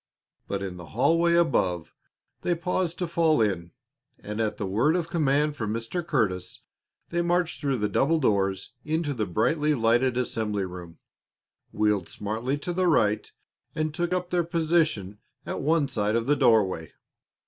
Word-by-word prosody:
But 100 0 -3
in 95 -2 -5
the 85 -2 -10
hallway 165 +6 +3
above 90 - +1 0.5
they 175 - +1
paused 175 0 -1
to 180 - -2
fall 165 -3 +2
in, 90 -6 0 0.5
and 105 +2 -5
at 110 -1 -1
the 105 - -3
word 115 - +2
of 170 -2 -1
command 150 -2 +2
from 110 -5 -3
Mr. 115 +11 -3
Curtis 105 - -1 0.5
they 170 0 0
marched 175 0 0
through 140 -3 0
the 105 -2 0
double 145 +10 +2
doors 95 -7 0
into 155 -1 -1
the 110 -5 -2
brightly 150 - +1
lighted 120 +1 +2
assembly 105 -5 -1
room, 90 -2 -9 0.7
wheeled 105 -4 +1
smartly 115 +7 -3
to 175 +5 -4
the 185 +1 +1
right, 110 -9 +2 0.4
and 155 -1 -1
took 175 +2 -2
up 180 -1 -1
their 175 -1 +2
position 160 - 0 0.3
at - - -4
one 155 0 +2
side 105 -4 0
of 115 0 0
the 145 +3 +3
doorway. 95 - +2
130 Hz, 160 wpm, -26 LUFS, 105-165 Hz, 0.7 s, hallway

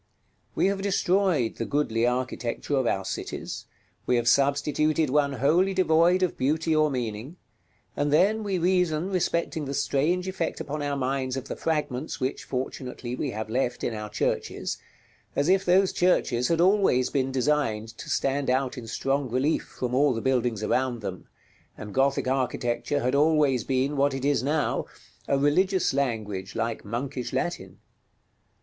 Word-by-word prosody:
We - - +2
have 195 0 +1
destroyed 185 - +1
the - - -2
goodly 120 -5 +1
architecture 125 +2 -2
of 130 -3 +1
our 95 -3 0
cities; - - -5 0.4
we 125 - +3
have 120 -1 0
substituted 145 +3 +2
one 140 -1 +2
wholly 175 +9 +2
devoid 175 +1 +4
of 185 - -1
beauty 155 +4 +1
or 155 0 +3
meaning; 125 +2 -4 0.6
and 145 0 0
then 200 +8 +3
we 195 -2 -1
reason 180 -1 +1
respecting 170 -4 -1
the 140 +1 -4
strange 165 +7 +1
effect 185 -3 -3
upon 150 +1 -4
our 145 -1 -1
minds 130 0 -1
of 135 0 -6
the - - -3
fragments 150 -3 -2
which, 130 0 -3
fortunately, 125 -1 -4
we 140 - -2
have 110 -2 -4
left 125 +2 -1
in 120 - -1
our 105 -1 -5
churches, 105 - -2 0.6
as 145 +4 +1
if 190 +1 +4
those 190 +1 +3
churches 125 -9 +2
had 165 -1 +1
always 185 -9 +3
been 135 -2 0
designed 130 -5 0
to - - -8
stand 140 0 0
out 130 0 0
in 115 - -9
strong 135 +3 -1
relief 130 +6 0
from 125 -1 -2
all 135 0 +3
the - - -2
buildings 120 -4 0
around 125 +1 0
them, 95 -3 -6 0.5
and 105 -1 -8
Gothic 135 0 +1
architecture 130 +1 -1
had 125 +2 0
always 145 -4 +3
been, 135 +2 0
what 140 0 +2
it 135 0 -3
is 145 0 +2
now, 150 +3 0 0.4
a 140 - +2
religious 185 +6 +2
language, 110 -8 -2
like 115 0 -2
Monkish 125 +4 -4
Latin. - - -3
140 Hz, 160 wpm, -26 LUFS, 125-160 Hz, 0.6 s, devoid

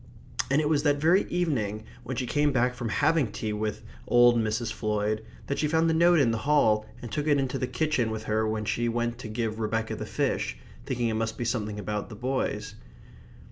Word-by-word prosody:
And 140 +2 +3
it 150 - 0
was 150 -2 +2
that 145 -1 +3
very 165 +7 +3
evening 115 - -1 0.2
when 125 0 -5
she 130 - -1
came 145 +4 +2
back 125 -1 +2
from 120 -2 -4
having 145 0 +2
tea 110 -1 -3
with 105 0 -3 0.2
old 120 0 +6
Mrs. 110 0 -1
Floyd 105 0 -1 0.2
that 140 - -2
she 150 - +2
found 160 +2 +2
the 165 - +2
note 170 +1 +5
in 125 -5 +4
the 115 - -1
hall 110 -6 +3 0.2
and 120 - -7
took 150 0 -2
it 145 -1 +4
into 135 -2 -1
the 130 - -1
kitchen 150 -7 0
with 110 0 -4
her 110 0 0
when 110 0 -2
she 120 +2 0
went 120 0 -1
to 120 - -6
give 110 0 -3
Rebecca 110 0 -1
the - - -6
fish, - - -1 0.3
thinking 120 -2 0
it - - -1
must 110 0 -2
be 120 - -3
something 110 -3 -2
about 105 +1 -3
the 110 - -8
boys. 130 +4 -2
120 Hz, 220 wpm, -27 LUFS, 110-145 Hz, 0.3 s, old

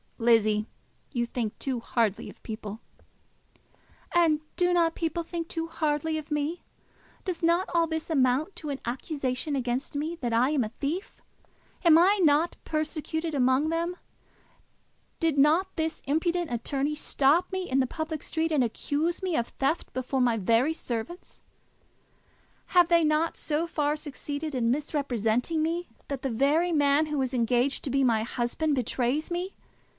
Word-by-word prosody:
"Lizzie, 215 -2 +3 0.4
you 240 -3 0
think 235 -3 -3
too 260 -3 -2
hardly 230 -3 -1
of - - -15
people." 215 -1 -6 1.3
"And 330 -3 +4 0.2
do 355 0 +2
not 335 -2 +3
people 335 0 -2
think 335 0 -5
too 330 -1 -3
hardly 315 -1 -1
of 305 - -11
me? 300 +3 -2 0.6
Does 365 -3 -3
not 340 +2 +2
all 335 -1 +3
this 320 0 -3
amount 280 +4 +2
to 300 - -6
an 275 -1 -3
accusation 265 +2 -2
against 255 +2 -2
me 310 +4 -2
that 240 -3 -1
I 245 +5 +3
am 285 -5 +2
a 215 - -3
thief? 325 +8 -3 0.6
Am 330 -3 +7
I 385 +5 +5
not 310 +2 +3
persecuted 315 +1 -2
among 260 +3 +3
them? 335 +2 -1 1.2
Did 320 -4 +1
not 325 +7 +3
this 320 0 -2
impudent 335 +2 0
attorney 275 +5 -1
stop 305 +4 +2
me 375 -1 -3
in 265 - +2
the 260 - +2
public 315 +1 -4
street 325 0 -1
and 290 -4 +3
accuse 295 - -1
me 365 -3 0
of 235 -3 0
theft 275 +5 -1
before 255 +1 -1
my 240 -2 +3
very 230 +9 +2
servants? 250 +4 -6 1.3
Have 355 -1 +4
they 340 -1 +5
not 310 +2 +1
so 310 +2 -1
far 300 -3 0
succeeded 295 0 -5
in 235 -3 +1
misrepresenting 275 0 0
me, 340 +2 -2 0.2
that 275 -2 -3
the 270 - -1
very 290 +9 +2
man 290 0 +3
who 300 -2 -1
is 260 0 -3
engaged 245 +3 +1
to - - -3
be 275 +1 +2
my 230 -4 +3
husband 240 +6 -1
betrays 255 +4 0
me? 360 +3 -3
295 Hz, 160 wpm, -27 LUFS, 255-330 Hz, 1.3 s, Am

